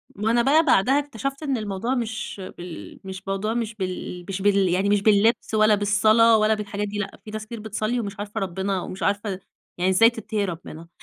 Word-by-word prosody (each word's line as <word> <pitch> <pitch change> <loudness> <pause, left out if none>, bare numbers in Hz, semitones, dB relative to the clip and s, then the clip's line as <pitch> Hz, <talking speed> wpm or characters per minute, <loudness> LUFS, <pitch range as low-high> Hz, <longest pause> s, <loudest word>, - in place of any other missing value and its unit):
وأنا 225 +4 +2
بقى 300 +6 +4
بعدها 265 +2 +4
اكتشفت 275 +1 -5
إن 275 -4 0
الموضوع 215 +4 -2
مش 225 -4 -4 0.2
بال 175 -1 -9
مش 190 0 -8
موضوع 195 +3 -1
مش 230 -2 -3
بال 185 -2 -5
مش 195 0 -3
بال 200 -2 +3
يعنيِ 190 +3 +1
مش 205 -1 +3
باللِّبس 220 +2 +3
ولا 215 0 +5
بالصلاة 215 +3 +4
ولا 215 0 +3
بالحاجات 210 -1 -3
دي 205 +1 -5
لأ، 195 -1 -5
في 215 - -8
ناس 215 0 -5
كتير 230 0 -8
بتصلِّي 220 +3 -2
ومش 200 -2 -5
عارفة 205 0 -4
رَبِّنا 190 0 -2
ومش 185 - -6
عارفة 200 -1 -1 0.4
يعني 180 +1 +1
إزاي 225 +5 +6
تتقي 220 -3 -3
رّبِّنا، 165 -2 -8
210 Hz, 195 wpm, -24 LUFS, 195-225 Hz, 0.4 s, إزاي